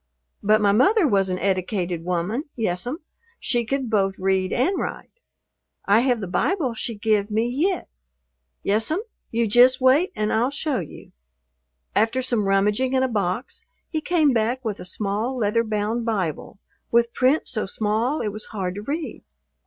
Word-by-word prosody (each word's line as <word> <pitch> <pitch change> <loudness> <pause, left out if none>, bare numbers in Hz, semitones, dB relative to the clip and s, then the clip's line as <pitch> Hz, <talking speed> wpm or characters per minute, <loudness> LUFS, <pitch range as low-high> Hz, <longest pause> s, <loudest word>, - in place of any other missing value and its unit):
But 215 +1 +3
my 205 -1 +4
mother 320 - +4
was 195 -5 +2
an 185 - -1
eddicated 185 -2 -1
woman, 180 - -2
yes'm, 225 - -2 0.4
she 240 -1 0
could 270 +1 -1
both 195 -3 +1
read 190 0 0
and 360 +11 +1
write. - - -6 0.7
I 205 +2 +5
have 245 -2 +1
the 195 - -4
Bible 275 - 0
she 230 0 -4
give 210 -1 +1
me 220 +2 +1
yit. 325 +9 0 0.8
Yes'm, 225 - +1 0.3
you 230 0 +1
jist 250 +4 +6
wait 270 +8 +4
and 215 -1 -1
I'll 235 +3 +2
show 285 -1 -2
you." 165 - -10 0.8
After 225 +5 +2
some 235 -5 0
rummaging 210 +6 +2
in 260 0 +3
a - - +2
box 205 0 -2 0.3
he 315 -3 -1
came 315 -5 +2
back 240 +3 0
with 210 -2 -3
a - - -8
small 210 +6 -2
leather 230 0 +1
bound 215 +2 -1
Bible 200 -5 -3 0.3
with 235 0 +2
print 265 +5 +2
so 215 -5 -2
small 220 +8 0
it 215 - -1
was 215 +1 -6
hard 185 -4 -4
to 205 - -6
read. 290 +2 -4
225 Hz, 165 wpm, -23 LUFS, 200-260 Hz, 0.8 s, jist